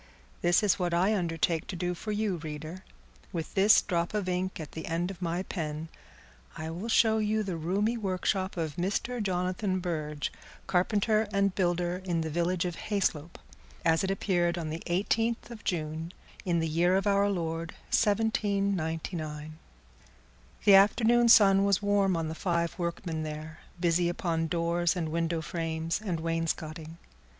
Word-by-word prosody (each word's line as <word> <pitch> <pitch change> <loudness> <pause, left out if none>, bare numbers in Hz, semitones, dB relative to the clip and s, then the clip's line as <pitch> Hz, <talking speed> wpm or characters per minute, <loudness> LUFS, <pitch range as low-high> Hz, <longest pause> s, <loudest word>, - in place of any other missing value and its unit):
This 175 +3 +3
is 205 -1 +3
what 175 -2 0
I 185 +5 +3
undertake 165 -3 0
to 190 - -5
do 180 0 -1
for 215 +5 -5
you, 210 -3 0
reader. 155 +3 -7 0.5
With 165 -4 -4
this 205 +2 +6
drop 175 +1 -1
of 205 -3 -1
ink 185 0 -2
at 155 - -7
the 160 - -7
end 170 +3 -1
of 185 -2 -11
my 175 +1 -1
pen, 160 -4 -4 0.7
I 160 0 -4
will 185 +8 -5
show 220 -1 +4
you 215 0 +1
the 190 -4 -3
roomy 195 +8 0
workshop 190 -1 -1
of 160 -3 -3
Mr. 205 +7 -1
Jonathan 185 0 -1
Burge, 155 -4 -3 0.3
carpenter 210 +4 +2
and 200 -1 +2
builder, 175 -1 0
in 175 -3 -1
the 160 -1 -3
village 175 +2 0
of 175 -2 -3
Hayslope, 175 -6 -1 0.5
as 165 +1 +3
it 190 - 0
appeared 175 -3 +1
on 160 -2 -3
the 160 - -5
eighteenth 225 +7 0
of 225 -3 -9
June, 160 -1 -3 0.3
in 175 -2 +1
the 165 -1 0
year 170 +4 +2
of 195 - -1
our 200 0 +3
Lord 165 -3 -3 0.2
1799. 180 -8 0 1.1
The 200 - +7
afternoon 230 +4 +5
sun 195 -3 +7
was 200 0 +2
warm 200 -3 +2
on 165 -1 -2
the 160 - -3
five 170 -1 -1
workmen 170 -1 -3
there, 155 0 -6 0.2
busy 175 0 +2
upon 165 -2 -1
doors 170 +1 +1
and 165 -3 -2
window 165 0 -1
frames 165 +2 -2
and 180 -6 -2
wainscoting. 165 -1 -3
175 Hz, 160 wpm, -29 LUFS, 165-195 Hz, 1.1 s, The